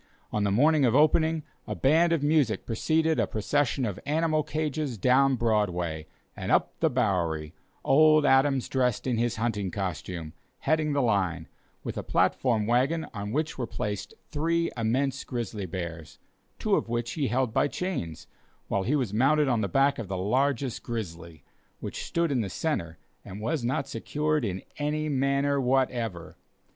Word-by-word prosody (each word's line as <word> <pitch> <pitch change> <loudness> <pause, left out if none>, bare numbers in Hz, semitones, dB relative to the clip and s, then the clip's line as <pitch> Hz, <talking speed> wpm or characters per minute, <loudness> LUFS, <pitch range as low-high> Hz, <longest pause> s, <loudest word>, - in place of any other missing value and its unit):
On 105 - 0
the 100 - +2
morning 145 +7 +4
of 120 -1 +3
opening, 155 +1 +3 0.2
a - - -3
band 160 +5 +3
of 165 -4 +1
music 145 -7 +2
preceded 160 +7 +1
a - - +2
procession 135 +4 0
of 100 -5 -4
animal 155 +1 +2
cages 150 -3 -2
down 130 +5 +4
Broadway 90 -9 0 0.3
and - - -4
up - - +2
the 160 - +3
Bowery, 90 - 0 0.3
old 155 +1 +5
Adams 135 -1 +3
dressed 125 -4 0
in 125 -3 0
his 120 0 0
hunting 110 -4 -1
costume, 90 -3 -4 0.3
heading 155 0 +1
the 140 -1 +2
line, 90 -7 0 0.4
with - - -4
a - - -5
platform 115 -5 +1
wagon 130 +8 +1
on 105 -1 -5
which 155 +3 -2
were 120 - -2
placed 105 -2 -4 0.2
three 165 +2 0
immense 130 +4 0
grizzly 110 -5 -4
bears, 80 -3 -6 0.4
two - - -1
of - - -1
which 120 0 -2
he 145 -1 -1
held 125 -2 0
by - - +3
chains, 90 - -4 0.4
while 100 - +1
he 125 +10 +1
was 125 -8 -1
mounted 140 +6 +3
on 120 -4 +2
the 100 - 0
back 135 +8 +2
of 110 - -5
the 95 0 -3
largest 130 +5 0
grizzly, 85 -8 -6 0.4
which - - -5
stood 170 -2 0
in 130 -4 +1
the 100 - -3
centre 85 - -2 0.3
and 95 - -8
was 130 +5 -2
not 130 +3 -1
secured 150 +1 -1
in 95 -4 -3 0.2
any 150 +1 -1
manner 140 0 +1
whatever. 125 -8 -1
125 Hz, 165 wpm, -27 LUFS, 105-145 Hz, 0.4 s, old